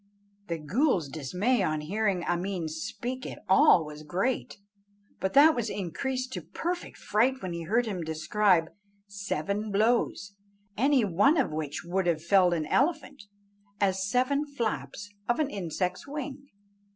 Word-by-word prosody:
The 170 - -2
ghool's 175 - +1
dismay 180 - 0
on 155 -4 0
hearing 195 +2 -1
Ameen 175 -1 -2
speak 240 +11 -5
at - - -9
all 185 -3 +6
was 150 0 -9
great, 190 +14 -2 0.6
but 190 - -1
that 305 +3 +7
was 235 -5 -2
increased 255 +8 -3
to - - -4
perfect 350 +1 -4
fright 255 +5 +1
when 180 -2 -3
he 170 -1 -5
heard 230 +7 +2
him 195 -5 -3
describe 165 +2 +2 0.3
seven 200 +1 -3
blows, 205 -2 +1 0.4
any 265 0 +3
one 205 - +3
of 270 - +1
which 150 -2 -4
would 185 +1 -1
have 160 -2 0
felled 180 0 +4
an 155 -2 -2
elephant, 290 - 0 0.6
as 190 -1 +1
seven 255 +5 +2
flaps 205 - -4 0.2
of 240 - +3
an 295 -2 0
insect's 180 - -3
wing. 280 -1 -6
200 Hz, 145 wpm, -28 LUFS, 170-255 Hz, 0.6 s, that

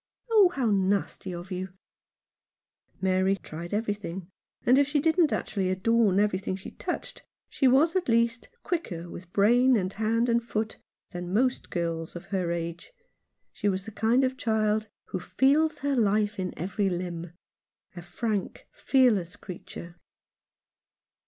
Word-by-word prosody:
" - - -42
Oh, 415 -5 +7
how 260 -10 0
nasty 195 -1 0
of 175 +2 -7
you! 185 0 -4 0.6
" - - -67 0.5
Mary 190 +1 +2
tried 170 -2 -8
everything, 205 -4 -3 0.3
and 255 +3 +6
if 285 - +3
she 295 0 +1
didn't 320 +1 +3
actually 190 -3 -1
adorn 200 +1 +3
everything 195 -2 0
she 190 - -9
touched, - - -5 0.3
she 270 - +2
was 290 +7 +4
at 365 -7 0
least 230 +1 +1
quicker 175 - -3
with 175 0 -10
brain 245 +6 +4
and 185 -1 -2
hand 225 +3 +1
and 235 0 +2
foot 220 -1 -3 0.3
than 175 0 -5
most 250 +6 +1
girls 165 -2 -3
of 175 - -7
her 180 -3 0
age. 170 - -4 0.6
She 205 - 0
was 190 0 -2
the 220 - -7
kind 225 +5 +2
of 260 0 0
child 215 -1 +1
" - - -67
who - - -3
feels 295 - +2
her 285 -1 +2
life 210 -2 +1
in 185 -1 -3
every 195 +3 -1
limb" 175 -1 -4 0.3
— - - -45
a 175 - -7
frank, 200 +3 -3
fearless 215 -9 +2
creature. 175 -2 -9
205 Hz, 155 wpm, -27 LUFS, 185-240 Hz, 0.6 s, Oh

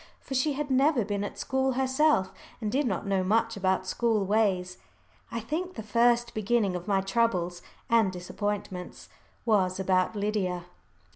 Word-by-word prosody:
For - - -8
she 270 +3 +1
had 285 0 -3
never 265 -3 +3
been 205 0 -2
at 205 - -6
school 265 0 0
herself, 265 -5 +2 0.3
and 215 -3 -2
did 275 +2 +1
not 190 -4 -2
know 195 -1 +1
much 225 +4 +1
about 190 -1 0
school 220 0 +1
ways. 190 -3 +1 0.5
I 230 - -2
think 325 +11 -4
the 220 - -6
first 235 +2 +2
beginning 215 -2 +1
of 180 +2 -6
my 195 -2 +2
troubles 190 -4 0 0.3
and 225 -4 +3
disappointments 185 0 -5 0.4
was 190 -5 +2
about 185 +1 +1
Lydia. 200 -4 -1
210 Hz, 155 wpm, -28 LUFS, 190-240 Hz, 0.5 s, never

